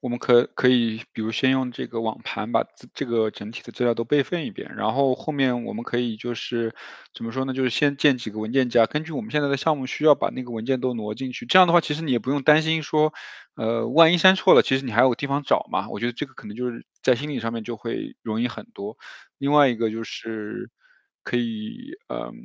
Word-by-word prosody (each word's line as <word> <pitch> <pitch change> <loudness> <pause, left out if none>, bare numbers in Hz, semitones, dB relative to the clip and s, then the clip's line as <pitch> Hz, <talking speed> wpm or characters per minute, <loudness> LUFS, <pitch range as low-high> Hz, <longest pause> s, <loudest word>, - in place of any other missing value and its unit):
我 - - -5
们 120 0 -3
可 120 -1 +5
可 125 - +3
以 115 -3 +2
比 - - -7
如 110 - -2
先 130 +4 +2
用 130 -1 0
这 - - -6
个 115 - -5
网 110 -1 -3
盘 - - -4
把 - - +2
自 - - -21
这 140 - -4
个 115 -2 +1
整 105 +1 -10
体 115 - -9
的 - - -12
资 125 - -3
料 120 - +3
都 115 - -2
备 140 +4 +2
份 170 0 -3
一 - - -5
遍， - - -10
然 110 - 0
后 135 -1 +2
后 155 - -6
面 130 -4 +1
我 - - -6
们 115 +2 -6
可 - - -3
以 120 -2 -1
就 120 +2 -5
是， 115 0 -3 0.4
怎 - - -8
么 115 - -4
说 130 +3 -2
呢， 135 - -3
就 130 - -1
是 125 - +2
先 140 +4 +1
建 140 -2 +4
几 120 -2 -6
个 110 +1 -7
文 110 +1 -4
件 130 -1 +2
夹， 115 -1 +5
根 150 +6 -3
据 160 - -9
我 - - -3
们 220 - -9
现 150 - +1
在 145 - +1
的 140 - +1
项 150 +1 +1
目 130 - -5
需 140 - -4
要 150 -2 +8
把 - - -1
那 130 - -6
个 125 - -11
文 115 -1 -5
件 130 -1 0
都 125 -1 -1
挪 105 -2 -4
进 130 +3 -5
去， 125 - -8
这 185 +10 +7
样 185 - +8
的 - - +3
话 175 - +7
其 150 - -3
实 160 - -5
你 155 - -3
也 125 - +3
不 125 - -10
用 140 0 0
担 155 +2 +6
心 160 0 0
说， 155 +1 +1 0.4
嗯， 115 +1 -2
万 165 0 +8
一 180 - +4
删 185 +3 +8
错 190 0 +5
了 - - +8
其 130 - +1
实 135 - -4
你 125 - -4
还 115 +2 +3
有 130 - +6
个 - - 0
地 140 - -5
方 140 +1 -1
找 - - +1
嘛， - - -2
我 - - -6
觉 120 - 0
得 120 - -1
这 140 +5 -5
个 130 - -23
可 - - -12
能 105 - -9
就 125 +1 -2
是 120 - -8 0.2
在 130 - +4
心 145 +5 -5
理 135 - -3
上 115 0 -3
面 115 -1 -4
就 115 +1 -6
会 115 +2 -6
容 110 0 -2
易 125 - +1
很 - - -9
多。 205 +2 -7 0.4
另 140 +1 -1
外 145 -2 +7
一 120 - -1
个 115 -1 0
就 115 +1 -5
是， 110 -1 -7 0.5
可 - - -2
以 235 +4 -5 0.2
呃 - - -5
125 Hz, 340 characters per minute, -23 LUFS, 115-145 Hz, 0.5 s, 要